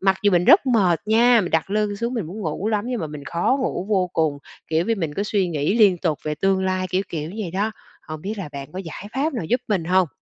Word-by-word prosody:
mặc 190 Hz, 0 st, +3 dB
dù 205 Hz, -, +4 dB
mình 175 Hz, 0 st, +3 dB
rất 340 Hz, -, +6 dB
mệt 195 Hz, -, +3 dB
nha, 235 Hz, +2 st, +5 dB
mình 180 Hz, -, -3 dB
đặt 160 Hz, +4 st, 0 dB
lưng 210 Hz, -1 st, 0 dB
xuống 235 Hz, +4 st, -2 dB
mình 210 Hz, -9 st, -2 dB
muốn 200 Hz, +6 st, -7 dB
ngủ 180 Hz, +4 st, -2 dB
lắm 210 Hz, -1 st, 0 dB
nhưng 245 Hz, -2 st, -2 dB
mà 160 Hz, -, -2 dB
mình 150 Hz, -1 st, -9 dB
khó 170 Hz, -, +1 dB
ngủ 225 Hz, -7 st, -2 dB
vô 190 Hz, -4 st, +1 dB
cùng, 155 Hz, -3 st, 0 dB, 0.3 s
kiểu, 160 Hz, +2 st, +1 dB
vì 230 Hz, -, +1 dB
mình 165 Hz, -8 st, -3 dB
có 200 Hz, -, -1 dB
suy 200 Hz, -3 st, 0 dB
nghĩ 155 Hz, +3 st, 0 dB
liên 195 Hz, -5 st, +5 dB
tục 160 Hz, -5 st, -1 dB
về 150 Hz, 0 st, -2 dB
tương 190 Hz, +3 st, +1 dB
lai, 185 Hz, 0 st, 0 dB
kiểu, 185 Hz, +1 st, +1 dB
kiểu, 155 Hz, -1 st, -4 dB
vậy 195 Hz, -6 st, -3 dB
đó. 200 Hz, +5 st, -1 dB, 0.4 s
Hông 155 Hz, -1 st, -6 dB
biết 210 Hz, +2 st, -4 dB
là 185 Hz, -6 st, -5 dB
bạn 140 Hz, +1 st, -8 dB
có 185 Hz, -, -6 dB
giải 190 Hz, +2 st, -7 dB
pháp 290 Hz, +4 st, 0 dB
nào 225 Hz, -, -3 dB
giúp 245 Hz, +10 st, +1 dB
mình 190 Hz, -6 st, 0 dB
hông? 185 Hz, 0 st, +3 dB
190 Hz, 275 wpm, -22 LUFS, 165-215 Hz, 0.4 s, rất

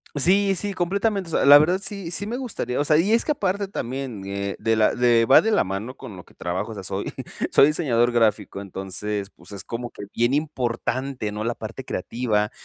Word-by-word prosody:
Sí, 195 Hz, +6 st, +3 dB
sí, 200 Hz, +3 st, -2 dB
completamente. 195 Hz, +2 st, -1 dB
O -, -, -9 dB
sea, -, -, +2 dB
la 145 Hz, +1 st, +10 dB
verdad 175 Hz, +5 st, +2 dB
sí 195 Hz, -3 st, -4 dB
sí 185 Hz, +4 st, -2 dB
me 230 Hz, +4 st, -3 dB
gustaría. 210 Hz, -, -3 dB
O -, -, +2 dB
sea 150 Hz, +1 st, +4 dB
Y 185 Hz, +7 st, +2 dB
es 230 Hz, -, +3 dB
que -, -, +1 dB
aparte 200 Hz, -5 st, -1 dB
también, 130 Hz, -, -5 dB
eh, 100 Hz, 0 st, -3 dB
de 115 Hz, 0 st, +1 dB
la 110 Hz, -1 st, +3 dB
de 120 Hz, -2 st, +4 dB
Va 130 Hz, -, +7 dB
de 225 Hz, -, 0 dB
la 210 Hz, -, +3 dB
mano 100 Hz, +7 st, -5 dB
con 125 Hz, -7 st, -9 dB
lo 90 Hz, -, -10 dB
que -, -, -21 dB
trabajo, 95 Hz, +5 st, -4 dB
o -, -, -6 dB
sea, 100 Hz, -, -8 dB
soy 95 Hz, +1 st, -4 dB, 0.4 s
soy 140 Hz, -, +6 dB
diseñador 125 Hz, -6 st, +1 dB
gráfico. 110 Hz, -4 st, +1 dB
Entonces, 100 Hz, +1 st, -4 dB
pues, -, -, -16 dB
es 100 Hz, -3 st, -7 dB
como 120 Hz, +1 st, -6 dB
que -, -, -9 dB
bien 120 Hz, +2 st, +1 dB
importante, 130 Hz, -4 st, -2 dB
¿no?, 105 Hz, +1 st, -4 dB
la 120 Hz, +2 st, -1 dB
parte 115 Hz, +4 st, -8 dB
creativa, 105 Hz, 0 st, -1 dB
125 Hz, 225 wpm, -23 LUFS, 105-175 Hz, 0.4 s, la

